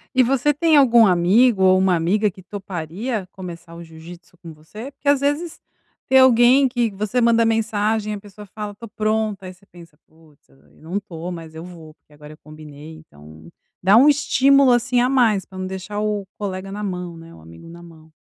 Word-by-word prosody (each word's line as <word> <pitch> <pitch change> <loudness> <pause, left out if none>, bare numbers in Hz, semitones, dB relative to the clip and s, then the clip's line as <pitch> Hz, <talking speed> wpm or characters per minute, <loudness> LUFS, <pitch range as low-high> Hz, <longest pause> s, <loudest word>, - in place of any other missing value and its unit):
E 255 - +5
você 275 +4 +1
tem 320 +2 +2
algum 240 -5 +5
amigo 190 +4 +3
ou 185 0 +5
uma 190 -1 +2
amiga 200 +6 0
que 185 - -16
toparia 190 +3 -6
começar 170 -2 -10
o 170 - -10
jiu-jitsu 165 +2 -14
com 165 -2 -12
você? 210 - -11
Porque 280 - -13
às 285 -1 +4
vezes, 290 +4 -2 0.5
tem 265 0 +5
alguém 260 +2 +5
que 240 -2 -1
você 210 +5 -2
manda 230 0 +3
mensagem 220 -1 -1
e - - -4
a - - -8
pessoa 205 0 -14
fala: 210 0 -8
"Tô 230 +3 -11
pronta" 215 -2 -2
aí 185 - -9
você 190 +2 -26
pensa: 170 -5 -17
"Putz, 155 - -26
eu 70 - -25 0.2
não 175 +6 -4
tô 180 -3 -8
mas 165 -2 -9
eu 160 - -8
vou, 165 -3 -13
porque 150 - -28
agora 150 +1 -14
eu - - -17
combinei 155 0 -13
então" 80 - -16 0.3
dá 195 +3 +5
estímulo 275 -2 +3
assim 245 +1 +1
a 250 - +1
mais 230 -7 +2
pra 190 - -14
não 185 0 -5
deixar 190 +2 -6
o 210 -2 -2
colega 195 -1 -6
na 210 +1 -6
mão, 180 -3 -5
né, 165 0 -14
o - - -16
amigo 85 - -15
na 170 +1 -13
mão. 160 -2 -17
195 Hz, 205 wpm, -20 LUFS, 165-230 Hz, 0.5 s, E